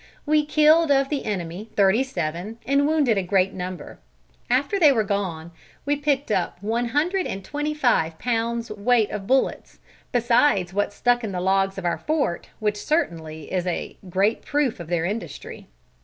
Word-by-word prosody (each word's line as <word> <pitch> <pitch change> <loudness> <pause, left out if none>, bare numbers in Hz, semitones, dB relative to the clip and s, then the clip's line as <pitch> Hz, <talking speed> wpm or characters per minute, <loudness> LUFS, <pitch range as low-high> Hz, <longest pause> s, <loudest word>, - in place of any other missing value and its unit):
We 305 0 +3
killed 310 +1 +5
of 275 -1 +3
the 290 -3 -2
enemy 190 +1 -4
thirty 200 +4 +4
seven 185 -3 -4
and 280 +3 +2
wounded 290 -9 +2
a - - 0
great 190 +1 +1
number. 180 0 -7 0.5
After 280 +11 +1
they 305 -5 +7
were 225 -5 +2
gone 185 -5 -3 0.3
we 290 +1 +2
picked 285 -3 -1
up 185 -4 0
one 230 +3 0
hundred 340 +9 0
and 195 0 -6
twenty 295 +4 -3
five 200 - +1
pounds 235 0 -2
weight 215 +1 +2
of 200 -2 -5
bullets, 265 +2 0 0.3
besides 235 -6 +2
what 205 +1 0
stuck 245 +3 +1
in 210 -3 -4
the 180 - -2
logs 195 +1 +1
of 190 - -5
our 175 - 0
fort, 295 - -1
which 210 -1 -1
certainly 160 - -2
is 185 -1 -1
a 175 - -3
great 195 +5 +1
proof 285 -7 0
of 170 - -7
their 170 -1 0
industry." 190 -5 -6
220 Hz, 170 wpm, -23 LUFS, 185-275 Hz, 0.5 s, they